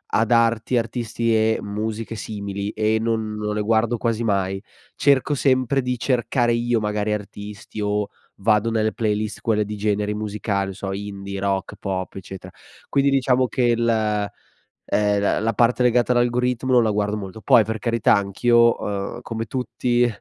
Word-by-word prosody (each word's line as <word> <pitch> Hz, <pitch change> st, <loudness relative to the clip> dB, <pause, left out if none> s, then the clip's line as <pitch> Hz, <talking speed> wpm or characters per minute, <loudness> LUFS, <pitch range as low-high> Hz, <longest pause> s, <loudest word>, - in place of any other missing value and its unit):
a 115 Hz, -, +3 dB
darti 115 Hz, +1 st, +2 dB
artisti 115 Hz, 0 st, -1 dB
e 110 Hz, 0 st, +3 dB
musiche 110 Hz, +2 st, -4 dB
simili, 100 Hz, -1 st, -5 dB
e 110 Hz, 0 st, +1 dB
non 110 Hz, -1 st, -1 dB
non 105 Hz, 0 st, -3 dB
le 105 Hz, -, 0 dB
guardo 115 Hz, +2 st, +1 dB
quasi 115 Hz, 0 st, -1 dB
mai. 95 Hz, -3 st, 0 dB, 0.3 s
Cerco 140 Hz, +1 st, +3 dB
sempre 130 Hz, 0 st, +2 dB
di 125 Hz, 0 st, -2 dB
cercare 120 Hz, -1 st, +1 dB
io 120 Hz, 0 st, +1 dB
magari 105 Hz, 0 st, -1 dB
artisti, 105 Hz, 0 st, -7 dB
o 105 Hz, 0 st, 0 dB, 0.3 s
vado 105 Hz, +2 st, +2 dB
nelle 110 Hz, -1 st, +1 dB
playlist 110 Hz, -1 st, -2 dB
quelle 105 Hz, -2 st, +1 dB
di 105 Hz, 0 st, -6 dB
generi 105 Hz, 0 st, 0 dB
musicali, 105 Hz, -1 st, -2 dB
non 95 Hz, -, -6 dB
so 95 Hz, 0 st, -5 dB
indie, 100 Hz, 0 st, -5 dB
rock, 95 Hz, -1 st, -2 dB
pop, 95 Hz, -2 st, -3 dB
eccetera. 95 Hz, -1 st, -9 dB, 0.4 s
Quindi 140 Hz, 0 st, +3 dB
diciamo 130 Hz, -2 st, +2 dB
che 125 Hz, -, -1 dB
il 120 Hz, -1 st, +2 dB, 1.0 s
ehm, 105 Hz, -1 st, +1 dB
la 100 Hz, -, +1 dB
la 115 Hz, +1 st, 0 dB
parte 120 Hz, +1 st, +2 dB
legata 125 Hz, -1 st, +3 dB
all'algoritmo 125 Hz, +1 st, +1 dB
non 120 Hz, -1 st, +6 dB
la 110 Hz, -, +1 dB
guardo 105 Hz, 0 st, -1 dB
molto. 100 Hz, +1 st, -8 dB
Poi 110 Hz, +3 st, +5 dB
per 110 Hz, +1 st, -4 dB
carità 115 Hz, +1 st, +2 dB
anch'io, 115 Hz, +4 st, +3 dB
uhm, 100 Hz, +4 st, -4 dB
come 115 Hz, -2 st, -4 dB
tutti 120 Hz, 0 st, 0 dB
110 Hz, 165 wpm, -22 LUFS, 105-120 Hz, 1.0 s, non